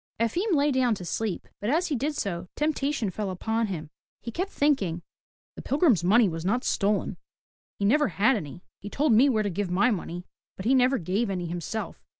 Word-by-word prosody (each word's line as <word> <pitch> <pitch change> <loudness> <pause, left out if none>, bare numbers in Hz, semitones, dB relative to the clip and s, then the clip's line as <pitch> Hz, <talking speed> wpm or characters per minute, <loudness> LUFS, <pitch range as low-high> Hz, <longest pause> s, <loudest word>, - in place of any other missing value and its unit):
Efim 350 - 0
lay 290 0 +3
down 255 -4 +2
to 185 - -8
sleep, 210 +1 -3
but 205 - -2
as 335 +6 +1
he 295 - 0
did 290 +5 -2
so 180 - -3
temptation 285 -7 -1
fell 205 +1 -3
upon 220 +5 -1
him. 160 -6 -6 0.3
He 235 - -7
kept 370 - -2
thinking, 200 - 0 0.5
The - - -8
pilgrim's 275 - +2
money 215 +5 +5
was 165 -2 -4
not 225 +7 0
stolen. 205 0 0 0.6
He 200 - -1
never 295 +8 +4
had 215 +6 +2
any. 170 -2 -6 0.2
He 205 - -8
told 280 +2 +2
me 255 +6 +6
where 220 -4 +1
to 205 - -1
give 195 +1 -2
my 200 +8 +3
money, 175 -3 -4 0.3
but 190 - -7
he 250 - +4
never 260 +1 +4
gave 200 +5 -1
any 180 -2 -2
himself. 175 +6 -5
220 Hz, 200 wpm, -27 LUFS, 185-270 Hz, 0.6 s, me